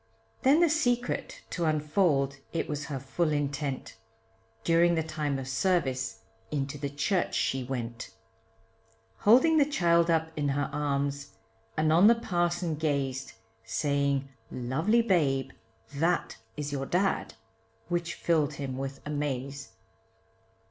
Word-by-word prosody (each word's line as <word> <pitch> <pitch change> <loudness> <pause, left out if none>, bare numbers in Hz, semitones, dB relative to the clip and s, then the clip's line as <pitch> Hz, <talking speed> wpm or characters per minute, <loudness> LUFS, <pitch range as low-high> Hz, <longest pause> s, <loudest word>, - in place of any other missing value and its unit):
Then 285 +5 +5
the 340 - +5
secret 245 -6 -1
to 170 - -1
unfold, 150 -3 +1 0.2
it 165 - -1
was 150 0 -3
her 140 -4 -4
full 155 +5 -1
intent, 140 -3 -2 0.7
During 170 +3 +4
the 160 - +1
time 155 -3 -2
of 135 -1 -5
service 130 -7 0 0.3
into 140 0 -3
the 140 0 -2
church 160 +7 0
she 130 -1 0
went, 120 -2 -5 1.1
Holding 285 +9 +5
the - - +7
child 170 - +3
up 160 -1 +1
in 145 -1 -1
her 140 +1 -1
arms, 140 0 -2 0.4
and 155 0 +3
on 175 +5 +7
the 235 - +7
parson 175 -5 -1
gazed, 135 -4 -1 0.3
Saying, 140 +2 0 0.2
lovely 160 - +1
babe, 135 - +1 0.4
that 165 +5 0 0.2
is 150 -1 -3
your 135 -1 -3
dad, 190 +2 0 0.5
which 170 -1 -2
filled 155 -4 +1
him 130 -2 -4
with 135 0 -5
amaze. 140 -1 -3
150 Hz, 130 wpm, -29 LUFS, 135-170 Hz, 1.1 s, the